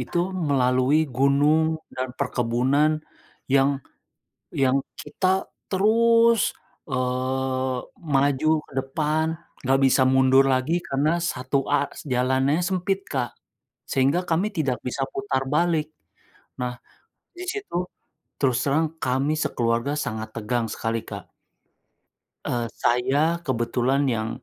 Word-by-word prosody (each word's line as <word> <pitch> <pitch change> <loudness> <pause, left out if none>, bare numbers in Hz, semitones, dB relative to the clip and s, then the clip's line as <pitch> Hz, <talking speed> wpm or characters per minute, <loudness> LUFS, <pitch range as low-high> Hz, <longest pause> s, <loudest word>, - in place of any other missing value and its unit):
itu 175 - -3
melalui 140 -3 +2
gunung 150 +4 +3 0.2
dan 130 0 -3
perkebunan 130 +3 +1 0.6
yang 135 0 +5 0.9
yang 130 +1 +3 0.2
kita 190 0 0 0.2
terus, 230 +3 +4 0.5
eee, 130 0 -1 0.4
maju 140 +2 +2 0.2
ke - - -22
depan 155 +3 -1 0.4
enggak 135 +1 +2
bisa 130 0 +4
mundur 130 +1 +5
lagi 130 +5 0 0.2
karena 140 +3 +1 0.2
satu 130 +2 -2
a 145 - +2 0.3
jalannya 130 +3 +2
sempit, 190 +1 0
Kak, 125 -4 -2 0.6
sehingga 135 +6 +2
kami 170 +5 +2
tidak 135 -6 0
bisa 135 +2 -2
putar 135 0 -1
balik. 165 -3 +2 0.8
Nah, 125 0 -2 0.6
di 360 - -6
situ 410 - -6 0.6
terus 130 -4 +2
terang 150 +3 +2 0.2
kami 135 +4 +1
sekeluarga 120 -2 0
sangat 110 -5 -3
tegang 115 +1 -1
sekali, 115 0 -2
Kak. - - -8 1.1
Eee, 120 -1 -1
saya 140 +8 +1
kebetulan 130 -1 0
yang, 115 -4 0
135 Hz, 110 wpm, -24 LUFS, 125-155 Hz, 1.1 s, yang